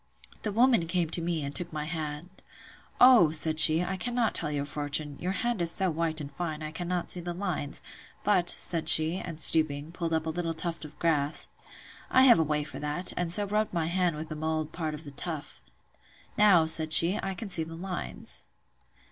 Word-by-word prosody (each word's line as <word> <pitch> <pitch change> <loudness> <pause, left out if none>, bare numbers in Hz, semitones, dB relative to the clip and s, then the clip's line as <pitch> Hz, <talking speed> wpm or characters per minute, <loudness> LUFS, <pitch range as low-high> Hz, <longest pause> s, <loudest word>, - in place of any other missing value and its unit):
The 215 - -4
woman 230 -5 +1
came 170 -2 -2
to 170 - 0
me, 165 -2 -3
and 140 0 -7
took 175 -2 0
my 150 -1 -6
hand. 155 +2 -8 0.6
O! 245 -10 +6
said 155 0 +3
she, 160 +2 +7
I 190 +1 -5
cannot 240 +2 -2
tell 160 - +4
your 145 -1 -4
fortune: 145 0 -2
your 180 - -3
hand 240 -3 -3
is 170 - +3
so 190 +1 +2
white 160 0 -3
and 145 -1 -9
fine, 155 0 -6
I 155 - -7
cannot 175 +2 -5
see 180 - 0
the 175 0 -7
lines: 175 -7 -5 0.4
but, 185 -4 +1
said 165 -2 +2
she, 160 +3 +5
and, 165 -3 -9
stooping, 155 0 +5
pulled 170 -2 -5
up 160 0 -2
a 160 - -3
little 165 0 -4
tuft 165 0 -5
of 150 0 -14
grass, 150 -3 -2 0.6
I 260 - +3
have 240 -8 +5
a - - +2
way 150 -1 -2
for 150 - -10
that; 150 +5 -2
and 175 -1 -3
so 205 +4 +3
rubbed 210 +1 -3
my 165 -2 -1
hand 175 -1 -1
with 155 +1 -8
the 155 - -7
mould 155 0 -4
part 160 -3 -5
of 150 - -12
the 145 - -11
tuft: 155 +1 -8 0.7
Now, 195 -6 +4
said 160 0 +4
she, 175 +7 +6
I 195 -1 -5
can 200 +2 -9
see 165 - +3
the 165 +1 -10
lines. 180 +1 -4
165 Hz, 210 wpm, -27 LUFS, 155-180 Hz, 0.7 s, she